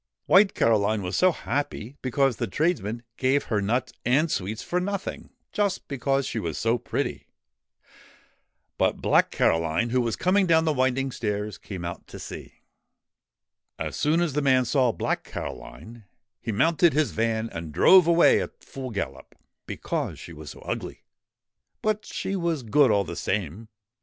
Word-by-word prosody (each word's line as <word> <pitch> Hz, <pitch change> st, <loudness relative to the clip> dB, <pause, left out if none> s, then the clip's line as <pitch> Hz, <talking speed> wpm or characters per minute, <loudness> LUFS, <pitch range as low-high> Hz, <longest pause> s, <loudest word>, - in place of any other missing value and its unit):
White 195 Hz, +1 st, +5 dB
Caroline 110 Hz, -2 st, +2 dB
was 90 Hz, +1 st, -3 dB
so 185 Hz, 0 st, +4 dB
happy, 140 Hz, -6 st, -4 dB
because 130 Hz, -1 st, +1 dB
the -, -, -2 dB
tradesman 120 Hz, -, -1 dB
gave 135 Hz, +2 st, +2 dB
her 105 Hz, -3 st, -1 dB
nuts 120 Hz, +4 st, -1 dB
and 145 Hz, +7 st, +2 dB
sweets 105 Hz, +4 st, -3 dB
for 180 Hz, -, -1 dB
nothing, 195 Hz, +1 st, -4 dB, 0.2 s
just 205 Hz, -3 st, -1 dB
because 135 Hz, 0 st, 0 dB
she 115 Hz, -, -3 dB
was 85 Hz, -7 st, -4 dB
so 115 Hz, +1 st, +1 dB
pretty. -, -, -3 dB, 1.5 s
But -, -, +2 dB
Black -, -, +3 dB
Caroline, 80 Hz, +8 st, +1 dB
who 125 Hz, 0 st, +2 dB
was 115 Hz, -2 st, -1 dB
coming 190 Hz, +1 st, +2 dB
down 160 Hz, -1 st, +4 dB
the 155 Hz, -, +2 dB
winding 130 Hz, 0 st, +1 dB
stairs, 105 Hz, -4 st, -3 dB
came 90 Hz, -4 st, -7 dB
out 85 Hz, -, -6 dB
to -, -, -10 dB
see. -, -, -10 dB, 1.1 s
As -, -, -4 dB
soon 160 Hz, +3 st, +2 dB
as 170 Hz, -5 st, 0 dB
the 150 Hz, -, 0 dB
man 130 Hz, -2 st, +3 dB
saw 125 Hz, 0 st, +2 dB
Black -, -, -2 dB
Caroline, 110 Hz, -, -8 dB, 0.4 s
he 115 Hz, -, -3 dB
mounted 160 Hz, -, +3 dB
his 150 Hz, 0 st, +1 dB
van 115 Hz, 0 st, 0 dB
and 80 Hz, -2 st, -6 dB
drove 180 Hz, -, +6 dB
away 170 Hz, 0 st, +5 dB
at -, -, -8 dB
full 130 Hz, -1 st, -7 dB
gallop, 95 Hz, -, -5 dB, 0.3 s
because -, -, -3 dB
she 85 Hz, -, -10 dB
was 75 Hz, -1 st, -9 dB
so -, -, -11 dB
ugly -, -, -5 dB, 0.8 s
but 215 Hz, 0 st, 0 dB
she 195 Hz, -, -3 dB
was 170 Hz, -6 st, -1 dB
good 135 Hz, +4 st, +4 dB
all 100 Hz, -2 st, +3 dB
the 85 Hz, -, -7 dB
same. 100 Hz, +3 st, -3 dB
125 Hz, 160 wpm, -25 LUFS, 105-155 Hz, 1.5 s, drove